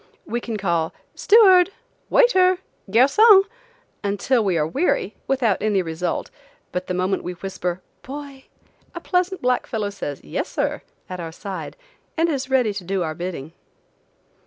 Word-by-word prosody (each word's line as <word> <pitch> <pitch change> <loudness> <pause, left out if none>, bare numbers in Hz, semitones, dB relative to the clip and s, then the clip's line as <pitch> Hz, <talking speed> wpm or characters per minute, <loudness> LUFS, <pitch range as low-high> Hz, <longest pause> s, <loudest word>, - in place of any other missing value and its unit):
We 240 +1 -3
can 230 -2 -4
call 170 -5 -1 0.2
"steward!.... 385 -5 +6 0.4
waiter!.... 370 -7 +4 0.3
garcon!" 380 - +6 0.6
until 205 +4 +1
we 190 -4 +1
are 150 - +1
weary, 210 - 0
without 250 -7 +1
any 205 -3 +1
result, 165 +1 -3 0.4
but 180 0 -4
the 180 - -2
moment 185 +1 0
we 180 - -4
whisper 180 0 -4 0.2
"boy!" 275 0 -9 0.5
a - - -4
pleasant 360 0 -1
black 250 0 +1
fellow 210 -3 -2
says, 145 -8 -6
"yes, 75 - -4
sir," - - -2 0.3
at 185 -1 -6
our 165 -1 -5
side, 195 - -7 0.4
and 330 +1 +2
is 270 -4 -2
ready 250 -5 +2
to 200 -2 -6
do 190 +1 -1
our 160 -1 -3
bidding. 165 -3 -6
205 Hz, 150 wpm, -22 LUFS, 180-280 Hz, 0.6 s, steward